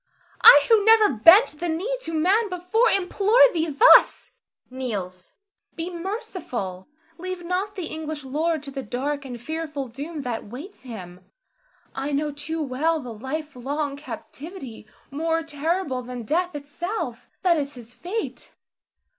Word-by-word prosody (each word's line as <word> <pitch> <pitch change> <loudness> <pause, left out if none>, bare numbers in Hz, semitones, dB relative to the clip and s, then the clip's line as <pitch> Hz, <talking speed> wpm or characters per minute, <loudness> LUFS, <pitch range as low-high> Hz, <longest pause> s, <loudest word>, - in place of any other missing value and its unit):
I 290 0 +9
who 445 -3 +5
never 445 -1 +6
bent 330 - +6
the 345 - -2
knee 375 +10 -1
to 330 - -5
man 395 +8 +2
before, 365 +6 +1
implore 395 +4 +2
thee 330 -1 0
thus 320 - +5 0.4
[kneels]. 200 -9 -5 0.4
Be 335 +2 -4
merciful! 335 - -5 0.3
Leave 370 0 -5
not 380 +4 -2
the 370 -5 -4
English 310 -2 -5
lord 310 +3 -1
to 280 - -7
the 270 0 -5
dark 280 +3 -3
and 245 -2 -7
fearful 300 0 -5
doom 290 +5 -6
that 240 -4 -4
waits 275 - -10
him. 185 -8 -10 0.7
I 275 +2 -3
know 295 +1 0
too 310 +2 -4
well 305 +5 0
the 250 -5 -7
life 290 +7 -5
long 280 +3 -3
captivity, 285 - -9 0.2
more 325 +3 -1
terrible 310 -2 -2
than 250 -1 -7
death 345 +7 -1
itself, 340 +9 -5
that 350 -3 +4
is 285 -1 -3
his 240 -1 -12
fate. 415 - -5
310 Hz, 145 wpm, -24 LUFS, 265-355 Hz, 0.7 s, I